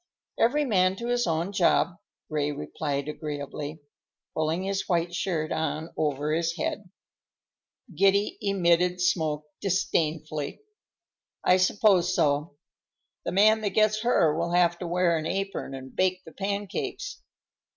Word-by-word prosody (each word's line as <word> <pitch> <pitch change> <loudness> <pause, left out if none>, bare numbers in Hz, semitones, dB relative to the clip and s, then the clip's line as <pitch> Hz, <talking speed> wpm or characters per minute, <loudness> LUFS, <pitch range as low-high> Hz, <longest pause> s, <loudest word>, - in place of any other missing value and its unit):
"Every 290 +6 +3
man 185 -6 +3
to 235 +4 -5
his 245 0 +1
own 165 +3 0
job," 180 -2 +2 0.3
Ray 150 -2 -1
replied 145 0 -3
agreeably, 150 0 -5 0.5
pulling 160 +3 -1
his 195 0 -2
white 175 -1 +1
shirt 165 -4 -1
on 160 0 -2
over 150 0 0
his 165 +1 0
head. 200 -3 -3 1.0
Giddy 195 +4 +3
emitted 180 -2 +2
smoke 155 -4 0
disdainfully. 155 - -1 0.8
"I 180 - +5
suppose 185 0 +3
so. 145 -1 +1 0.7
The - - -1
man 215 +3 +5
that 205 -2 -2
gets 215 0 +3
her 170 -10 +3
will 170 +1 -1
have 175 -1 +3
to 180 - -4
wear 170 -1 +2
an 155 - -3
apron 195 -7 -3
and 130 0 -10
bake 185 0 +1
the 160 - -11
pancakes. 200 - -4
175 Hz, 130 wpm, -27 LUFS, 155-195 Hz, 1.0 s, I